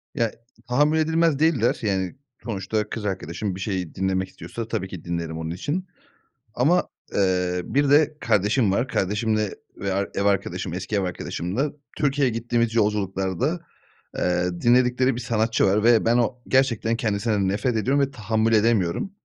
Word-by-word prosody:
Ya, 115 -3 +1 0.4
tahammül 150 +5 +3
edilmez 160 -2 +2
değiller. 145 -9 +2
Yani, 95 -1 -1 0.3
sonuçta 110 -1 -2
kız 110 - -5
arkadaşım 95 0 -3
bir 95 - -8
şeyi 95 -4 -3
dinlemek 95 0 -1
istiyorsa 115 -1 -7
tabii 95 -3 -2
ki 90 -4 -9
dinlerim 85 -2 -3
onun 80 0 -4
için. 160 - -3 0.7
Ama, 150 +9 +2 0.2
eee, 90 -2 +1
bir 140 +6 +1
de 150 +1 +4
kardeşim 105 +1 +2
var, 120 +6 +1
kardeşimle 105 0 0 0.2
ve 100 -1 -2
ar 100 +1 -1
ev 100 - 0
arkadaşım, 95 -3 0
eski 95 +3 -3
ev 100 - +2
arkadaşımla 90 - -2 0.3
Türkiye'ye 140 -3 +2
gittiğimiz 115 0 0
yolculuklarda, 105 - 0 0.6
eee, 90 0 +1
dinledikleri 125 +1 +3
bir 125 - -4
sanatçı 115 -1 +1
var 100 +2 +2
ve 115 -1 +5
ben 115 +1 +4
o 125 +1 0
gerçekten 115 -4 +2
kendisinden 105 -3 0
nefret 105 +5 0
ediyorum 135 +6 +1
ve 140 0 0
tahammül 110 -2 0
edemiyorum. 110 - +2
110 Hz, 155 wpm, -24 LUFS, 95-125 Hz, 0.7 s, ve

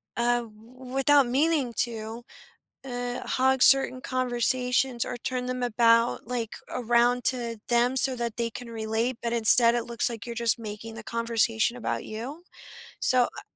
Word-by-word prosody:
uh, 240 0 +1
w 235 +3 -13
without 275 0 +4
meaning 275 -1 +1
to, 225 0 -8 0.6
uh, 245 -1 -5
hog 265 0 +1
certain 270 -1 +5
conversations, 250 0 0
or 245 - -5
turn 250 +1 -4
them 255 0 -4
about, 230 0 +2
like, 235 -3 -4 0.2
around 240 +1 +1
to 235 -3 -1
them, 240 +1 +2
so 265 0 +4
that 235 -2 -4
they 235 -1 -1
can 235 +1 -9
relate, 225 +2 -2
but 235 - -3
instead, 235 +1 +5
it 240 - -1
looks 235 +1 -1
like 230 -3 -7
you're 235 - -6
just 235 -1 +1
making 220 0 -8
the 230 - -9
conversation 230 0 0
about 240 - -3
you. 255 +10 -8 0.6
So, 255 -1 +4
I - - -7
240 Hz, 160 wpm, -26 LUFS, 230-255 Hz, 0.6 s, certain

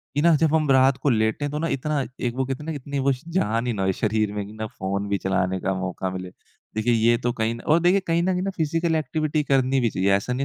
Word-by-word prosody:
कि 145 - +2
ना 170 -1 +5
जब 160 0 +2
हम 155 -3 +1
रात 130 0 +5
को 145 - 0
लेटे 110 +5 +1
तो 150 +1 -3
ना 165 - -1
इतना 150 +2 -1 0.2
एक 120 -1 -1
वो 130 0 0
इतनी 145 0 -4
वो 135 +1 +2
श 130 - -4
जान 120 - 0
ही 120 - 0
ना 95 -2 -2
हो 95 - +2
शरीर 110 +1 0
में 105 -1 -3
कि 105 - -11
ना 110 0 -5
फ़ोन 100 0 -3
भी 100 - +1
चलाने 95 -1 0
का 95 +1 -1
मौका 95 0 -3
मिले। 95 0 -6 0.5
देखिए 110 +2 +1
ये 115 +1 +3
तो 120 - +1
कहीं 110 0 -1
न 115 - -9
और 155 +2 +5
देखिए 180 +3 +4
कहीं 165 +1 +2
न - - 0
कहीं 180 - -1
ना 195 - -1
फ़िज़िकल 165 +1 0
एक्टिविटी 155 0 -1
करनी 135 -1 +2
भी 120 -2 +2
चाहिए। 95 -1 +1
ऐसा 100 +6 0
नहीं 130 - -2
125 Hz, 270 wpm, -24 LUFS, 105-150 Hz, 0.5 s, ना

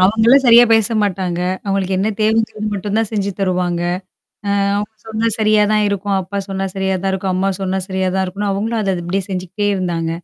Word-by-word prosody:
அவங்களும் 225 +7 +5
சரியா 240 +1 +8
பேச 225 0 +3
மாட்டாங்க, 185 -3 -1 0.2
அவுங்களுக்கு 195 -1 -1
என்ன 200 - +1
தேவைங்கிறத 220 0 +1
மட்டும் 200 +2 -3
தான் 225 - 0
செஞ்சு 200 -2 -1
தருவாங்க, 180 -2 0 0.8
அ - - +1 0.2
"அவுங்க 210 +1 -3 0.2
சொன்னா 220 +1 -1
சரியா 215 -1 +4
தான் 210 -1 +3
இருக்கும். 200 0 -1
அப்பா 195 +2 -5
சொன்னா 195 0 -2
சரியா 190 0 0
தான் 195 - 0
இருக்கும் 190 0 -1
அம்மா 190 +1 +1
சொன்னா 190 0 -1
சரியா 190 -1 -1
தான் 190 - +1
இருக்குன்னு", 200 +2 -3
அவுங்களும் 220 +3 -1
அத 195 -2 0
அப்பிடியே 185 +3 -2
செஞ்சுகிட்டே 185 +2 -3
இருந்தாங்க. 170 -3 -2
195 Hz, 190 wpm, -18 LUFS, 185-215 Hz, 0.8 s, சரியா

